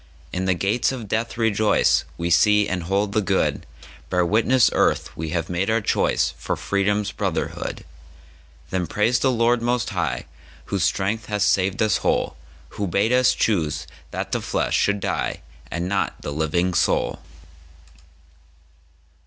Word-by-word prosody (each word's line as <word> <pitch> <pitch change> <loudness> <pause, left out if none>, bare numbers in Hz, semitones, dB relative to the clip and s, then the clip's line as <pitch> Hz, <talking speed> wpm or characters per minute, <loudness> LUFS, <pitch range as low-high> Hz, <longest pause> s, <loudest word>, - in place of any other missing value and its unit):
In 90 +1 -1
the 95 -1 +2
Gates 100 +9 +1
of 120 -5 -6
Death 115 +3 -2
rejoice! 110 -2 +2
We 85 0 -2
see 105 +4 +4
and 90 -1 -2
hold 100 +4 0
the 110 - +1
good—Bear 90 -1 -2
witness, 115 +6 +3
Earth, - - +1
we 80 0 -4
have 85 0 -2
made 90 +3 -1
our 110 +1 +3
choiceFor 105 - 0
Freedom's 100 +1 0
brotherhood. - - -3 0.9
Then 90 -2 -1
praise 115 +8 +1
the 135 - +2
Lord 120 0 +2
Most 120 0 0
HighWhose 100 - -5
Strength 100 +5 0
hath 105 -1 0
saved 95 +1 +2
us 110 -3 +2
whole, - - 0 0.3
Who 100 - -3
bade 100 +6 +1
us 125 0 +4
choose 80 -8 0 0.2
that - - -5
the - - 0
Flesh - - -1
should 100 0 +2
dieAnd - - -2 0.4
not 95 +3 -1
the - - -4
living 80 +4 0
Soul! 85 - +1
100 Hz, 140 wpm, -23 LUFS, 90-110 Hz, 0.9 s, see